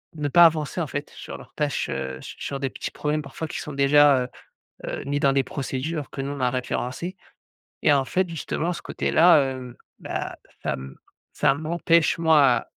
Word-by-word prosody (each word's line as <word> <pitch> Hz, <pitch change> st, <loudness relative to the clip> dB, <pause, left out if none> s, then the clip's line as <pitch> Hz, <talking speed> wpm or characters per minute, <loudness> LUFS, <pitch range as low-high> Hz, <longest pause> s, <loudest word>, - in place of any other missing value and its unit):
ne 150 Hz, -1 st, -2 dB
pas 170 Hz, +4 st, +8 dB
avancer 155 Hz, +1 st, +1 dB
en 155 Hz, -, -2 dB
fait 145 Hz, +2 st, -5 dB
sur -, -, -9 dB
leurs -, -, -15 dB
tâches, 150 Hz, -2 st, -1 dB
heu, 65 Hz, 0 st, -4 dB
su -, -, -9 dB
sur 140 Hz, -1 st, -4 dB
des 135 Hz, -1 st, -1 dB
petits -, -, -6 dB
problèmes 150 Hz, 0 st, -1 dB
parfois 145 Hz, +4 st, -6 dB
qui -, -, -5 dB
sont 150 Hz, -, -6 dB
déjà, 140 Hz, -1 st, +5 dB
heu -, -, -5 dB, 0.6 s
heu, -, -, -4 dB
mis 145 Hz, +1 st, 0 dB
dans 135 Hz, -1 st, +4 dB
des 135 Hz, 0 st, +3 dB
procédures 140 Hz, +3 st, -4 dB
que 135 Hz, -, -6 dB
nous 135 Hz, +1 st, -3 dB
on 140 Hz, -, -6 dB
a 125 Hz, -1 st, +2 dB
référencées 130 Hz, +7 st, -3 dB, 0.7 s
et -, -, +5 dB
en 135 Hz, -1 st, +2 dB
fait 185 Hz, +4 st, 0 dB
justement 165 Hz, +1 st, -2 dB
ce 170 Hz, -, -7 dB
côté-là, 165 Hz, -1 st, +4 dB, 0.2 s
heu, 125 Hz, -2 st, -9 dB, 0.2 s
bah -, -, -4 dB, 0.3 s
ça -, -, 0 dB
me 65 Hz, 0 st, -9 dB, 0.4 s
ça 150 Hz, -2 st, +3 dB
m'empêche 165 Hz, +2 st, +2 dB
moi 145 Hz, -7 st, +4 dB
145 Hz, 195 wpm, -24 LUFS, 135-160 Hz, 0.7 s, pas